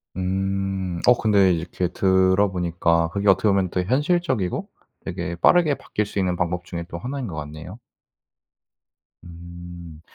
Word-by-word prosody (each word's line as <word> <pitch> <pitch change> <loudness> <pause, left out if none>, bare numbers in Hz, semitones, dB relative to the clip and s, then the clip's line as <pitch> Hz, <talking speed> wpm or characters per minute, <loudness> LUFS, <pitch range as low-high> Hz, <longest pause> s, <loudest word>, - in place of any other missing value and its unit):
음. 95 -1 -2
어 125 - +7
근데 100 -5 +4
이렇게 85 +1 -2
들어 95 +2 +2
보니까 85 -2 +1
그게 100 +3 -2
어떻게 100 +2 +4
보면 95 -2 +1
되게 90 +1 -2
현실적이고 140 - 0 0.4
되게 85 - -4
빠르게 155 - +4
바뀔 105 -5 -3
수 100 0 -4
있는 90 -2 0
방법 90 0 -2
중에 85 -1 -6
또 85 -1 -7
하나인 130 +4 -4
것 85 - -6
같네요. 75 +7 -8 1.4
음. 85 -1 -11
95 Hz, 290 characters per minute, -23 LUFS, 85-100 Hz, 1.4 s, 어